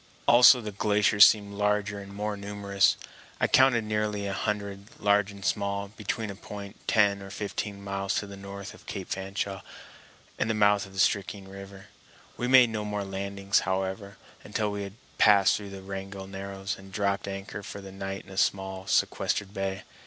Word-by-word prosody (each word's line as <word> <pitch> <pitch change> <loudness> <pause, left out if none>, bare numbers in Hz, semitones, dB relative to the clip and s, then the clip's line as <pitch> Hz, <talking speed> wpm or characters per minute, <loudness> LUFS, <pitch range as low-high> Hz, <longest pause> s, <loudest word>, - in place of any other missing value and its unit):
Also 125 +1 +8
the 105 -1 -5
glaciers 105 0 +5
seemed 100 -2 +2
larger 105 0 0
and 100 0 -10
more 105 +1 -3
numerous. 100 -1 +1 0.4
I - - +3
counted 130 -3 +5
nearly 105 -1 -1
a 100 - -2
hundred, 100 -1 -3
large 105 0 +3
and 100 -1 -9
small, 100 -1 -1
between 110 0 -4
a - - -8
point 100 +1 -9
ten 100 -2 +3
or 95 - -9
fifteen 100 0 -5
miles 100 0 -2
to - - -1
the 100 0 -9
north 100 0 -8
of - - -17
Cape 95 -2 -6
Fanshawe 95 0 -3 0.8
and - - 0
the 110 - +1
mouth 105 -1 +3
of 95 - -15
the 95 - -6
Stickeen 100 0 +1
River. 100 0 -11 0.5
We 125 - -2
made 130 -2 +7
no 110 -1 -2
more 105 -1 -3
landings, 100 0 -1
however, 95 +2 -3 0.3
until 105 0 -2
we 100 0 -4
had 100 -1 -6 0.3
passed 100 -2 +6
through 100 -1 -6
the 95 -1 -9
Wrangell 95 0 -6
Narrows 95 0 -5
and 95 0 -13
dropped 100 0 -1
anchor 100 +1 -6
for 100 - -8
the 95 -1 -10
night 95 0 -6
in - - -14
a 95 - -9
small 95 -1 0
sequestered 100 +1 0
bay. 95 -1 -3
100 Hz, 180 wpm, -28 LUFS, 95-105 Hz, 0.8 s, Also